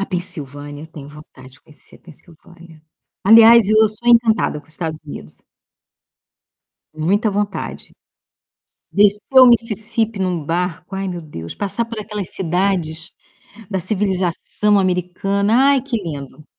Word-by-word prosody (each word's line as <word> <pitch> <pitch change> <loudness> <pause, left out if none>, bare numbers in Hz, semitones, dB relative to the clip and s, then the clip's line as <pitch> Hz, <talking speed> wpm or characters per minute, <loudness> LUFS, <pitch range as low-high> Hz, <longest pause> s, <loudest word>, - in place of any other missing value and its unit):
A 195 - -2
Pensilvânia, 145 -4 -2
eu - - -10
tenho 150 -3 -12
vontade 145 -3 -15
de 145 - -20
conhecer 150 -2 -18
a - - -26
Pensilvânia. 170 0 -18 0.4
Aliás, 225 0 +7
eu 215 0 +4
sou 215 +3 -4
encantada 230 -8 +3
com 145 - -28
os 155 - -5
Estados 160 -2 -4
Unidos. 75 - -11 1.5
Muita 200 +8 0
vontade. 205 0 -4 1.0
Descer 210 +6 +3
o 255 - +9
Mississipi 225 -2 +1
num 180 -4 -2
barco, 180 +3 -3
ai, 195 0 -3
meu 175 -2 -5
Deus, 85 - -9
passar 210 +3 -3
por 230 -2 -7
aquelas 210 -3 -6
cidades 175 -3 -2 0.6
da 190 -2 -2
civilização 190 +1 0
americana. 190 +3 -1 0.2
Ai, 275 -3 +2
que 260 -3 -3
lindo! 150 -2 -8
185 Hz, 135 wpm, -18 LUFS, 160-210 Hz, 1.5 s, o